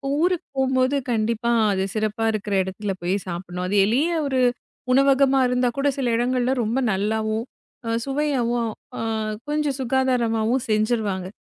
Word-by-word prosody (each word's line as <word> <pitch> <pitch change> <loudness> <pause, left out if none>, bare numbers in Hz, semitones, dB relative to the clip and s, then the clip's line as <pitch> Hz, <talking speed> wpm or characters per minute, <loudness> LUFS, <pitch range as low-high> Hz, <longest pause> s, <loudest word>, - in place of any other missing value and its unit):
ஊருக்குப் 350 +1 0
போம்போது 260 +1 +2 0.2
கண்டிப்பா 230 +1 0 0.2
அது 190 - 0
சிறப்பா 215 +1 -1
இருக்குற 210 -1 -2
இடத்துல 195 +1 -4
போய் 180 +3 0
சாப்புட்ணும். 180 +1 -5
அது 200 - -1
எளிய 265 +11 +2 0.2
ஒரு 260 -2 +1 0.5
உணவகமா 275 0 +4
இருந்தா 250 0 +1
கூட 275 +1 +1
சில 255 -3 0
இடங்கள்ல 250 +1 +1
ரொம்ப 230 +5 0
நல்லாவும், 220 +3 -1 0.6
சுவையாகவும், 255 -5 0 0.3
அ - - -2 0.5
கொஞ்ச 295 -2 0
சுகாதாரமாகவும் 250 -2 +1
செஞ்சிருவாங்க. 215 -4 0
235 Hz, 125 wpm, -23 LUFS, 215-265 Hz, 0.6 s, உணவகமா